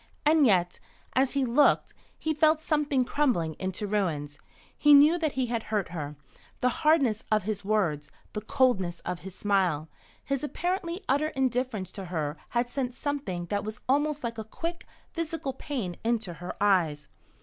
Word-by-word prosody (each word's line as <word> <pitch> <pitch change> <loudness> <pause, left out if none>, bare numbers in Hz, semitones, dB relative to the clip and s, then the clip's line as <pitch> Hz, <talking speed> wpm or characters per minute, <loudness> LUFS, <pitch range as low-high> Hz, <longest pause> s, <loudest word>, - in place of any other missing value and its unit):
And 300 -2 +5
yet, 180 -4 +2 0.3
as 260 0 +2
he 275 -2 +1
looked, 265 +5 +3 0.2
he 315 - -1
felt 310 +1 +4
something 295 -4 +1
crumbling 235 - +1
into 190 +2 -3
ruins. 160 -8 -1 0.4
He 295 -1 +7
knew 300 +5 +6
that 315 -3 0
he 260 -2 0
had 235 -1 -1
hurt 210 -5 0
her. 150 -4 -5 0.5
The 250 - +4
hardness 275 -9 +3
of 215 -2 +3
his 205 0 -3
words, 195 -8 0 0.2
the 210 - -3
coldness 205 -7 +1
of 180 -1 -4
his 190 0 -9
smile, 180 -7 +1 0.3
his 275 -1 -2
apparently 355 +4 -2
utter 285 +3 +2
indifference 250 - -1
to 195 - -7
her 155 -4 -2
had 240 0 0
sent 250 -2 -2
something 270 -14 -3
that 205 -1 0
was 215 0 -6
almost 290 +2 +1
like 230 -1 -3
a - - -3
quick, 335 +10 -5 0.3
physical 330 -5 -3
pain 250 - -4
into 225 -6 0
her 175 +2 -7
eyes. 175 -8 +2
235 Hz, 165 wpm, -28 LUFS, 185-290 Hz, 0.5 s, He